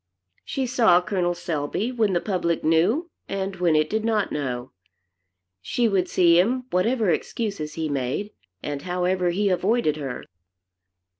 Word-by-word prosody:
She 270 - -2
saw 225 -8 +4
Col. 180 -1 -1
Selby, 170 - -2
when 220 -6 +1
the 175 - +2
public 170 -4 -1
knew 195 - +2 0.2
and 195 -1 -3
when 175 -3 +2
it 155 0 +3
did 215 +5 -1
not 220 -3 0
know. 130 -4 -3 0.9
She 240 - 0
would 185 -4 +1
see 170 -1 +5
him, 250 +7 +1
whatever 215 +2 +2
excuses 165 -3 -3
he 160 -1 -2
made, 140 +9 -2 0.3
and 145 -1 -4
however 180 +1 0
he 200 +4 +1
avoided 185 -3 +1
her. 135 -4 -5
180 Hz, 145 wpm, -24 LUFS, 160-215 Hz, 0.9 s, see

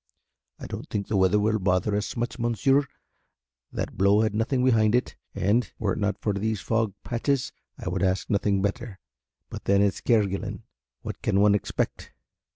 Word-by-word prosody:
"I - - -9
don't - - -7
think 100 -1 -2
the 105 - 0
weather 95 +1 +4
will 110 +1 +1
bother 95 +2 +1
us 105 +3 -3
much, 120 +2 -3
monsieur, 135 +4 +2 0.8
that - - -4
blow 100 +2 +5
had 110 -1 +1
nothing 125 +4 +1
behind 110 -3 +4
it, 125 - 0 0.2
and 105 +3 +1
were 100 -4 0
it - - -4
not 100 -1 0
for 105 0 -1
these 105 +1 -1
fog 110 -1 -1
patches 130 +2 -1 0.3
I - - -8
would - - -1
ask 95 -1 +1
nothing 100 -1 +1
better; 105 0 -3 0.5
but - - -7
then 100 +1 +4
it's 100 -1 0
Kerguelen 105 -5 0 0.4
what - - -6
can 100 - +1
one 105 0 +5
expect!" 105 - -2
105 Hz, 175 wpm, -26 LUFS, 100-115 Hz, 0.8 s, blow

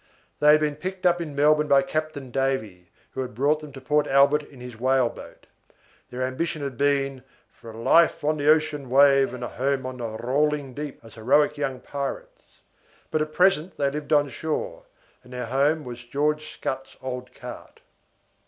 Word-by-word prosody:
They 150 - +5
had 155 - +5
been 150 -1 -1
picked 185 +3 -6
up 175 -1 +3
in 150 -4 -6
Melbourne 150 +1 +3
by 140 -1 +5
Captain 155 -3 -4
Davy, 110 -10 -2 0.2
who 130 - -4
had 125 -3 -6
brought 145 +5 +2
them 150 -1 -10
to 135 - -9
Port 150 +3 +1
Albert 140 +2 +4
in 145 -3 -16
his 125 -1 -9
whaleboat. 130 +1 -1 0.6
Their 125 +1 -4
ambition 150 +4 -2
had 140 -2 -4
been 140 0 0 0.3
for 115 - -14
"a 110 - -10
life 165 +9 +3
on 155 +1 +1
the 145 0 +1
ocean 155 -3 +2
wave, 135 0 +5
and 125 -1 -7
a - - -2
home 135 0 -1
on 130 0 -5
the 120 -2 -4
rolling 140 +2 0
deep," 145 +1 -6
as 115 - -14
heroic 145 +7 +2
young 135 -3 -3
pirates; - - -7 0.5
but 155 - +1
at 155 0 -2
present 180 -1 +2
they 140 -1 +1
lived 150 +1 -6
on 145 -1 +4
shore, 160 - -4 0.4
and 125 0 -14
their 125 -1 -4
home 140 +6 +1
was 120 -2 -8
George 150 +4 -1
Scutt's 135 0 -5
old 125 -1 -5
cart. - - -10
140 Hz, 185 wpm, -25 LUFS, 130-150 Hz, 0.6 s, They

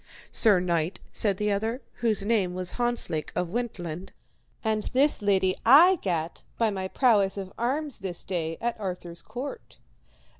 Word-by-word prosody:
Sir 210 -5 +5
knight, 170 -1 -1
said 200 -3 0
the 210 +1 0
other, 220 +5 -1 0.2
whose 215 -4 +1
name 200 -5 +1
was 185 -1 -4
Hontzlake 240 -10 -2
of 180 - -1
Wentland, 185 -6 -4 0.5
and 220 -1 +1
this 280 +1 +3
lady 190 -2 +2
I 335 +10 +8
gat 170 -3 -2
by 225 -2 +2
my 190 -1 -3
prowess 205 -4 +3
of 190 -1 -6
arms 275 +4 -2
this 185 -3 -5
day 165 -3 -3
at 235 -1 -2
Arthur's 180 -3 -5
court. 285 - -7
200 Hz, 150 wpm, -27 LUFS, 180-235 Hz, 0.5 s, I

